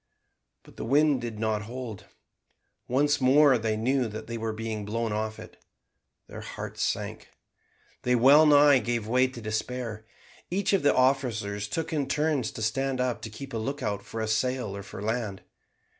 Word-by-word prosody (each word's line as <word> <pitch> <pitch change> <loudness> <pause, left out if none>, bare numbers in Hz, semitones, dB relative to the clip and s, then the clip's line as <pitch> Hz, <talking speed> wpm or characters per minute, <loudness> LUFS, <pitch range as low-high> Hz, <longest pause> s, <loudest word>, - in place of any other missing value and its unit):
But - - -18
the - - -5
wind 145 +1 +3
did 115 -2 -5
not 110 -1 -1
hold. 115 -2 -7 0.8
Once 145 +3 +2
more 135 0 +5
they 110 -1 -1
knew 125 +2 +1
that 110 0 -7
they 115 - -6
were 115 -1 -2
being 110 -1 -4
blown 115 +2 -2
off 110 0 -2
it. - - -13 0.6
Their - - -9
hearts - - -7
sank. - - -2 0.7
They 125 0 +2
wellnigh 145 +2 +7
gave 115 -1 -2
way 125 +3 +3
to 130 -2 -9
despair. 110 0 -4 0.4
Each 195 +2 0
of 195 - +3
the 145 - +3
officers 115 -6 +1
took 160 +8 -3
it - - 0
in 140 -2 -1
turns 150 -5 0
to 110 - -5
stand 130 +4 -1
up 125 -1 -1
to 115 - -6
keep 135 +5 -9
a - - -1
lookout 125 -4 -3
for 110 +2 -6
a 110 - -1
sail 120 -1 -1
or 100 - -6
for 100 0 -9
land. 110 -3 -3
120 Hz, 175 wpm, -27 LUFS, 110-135 Hz, 0.8 s, wellnigh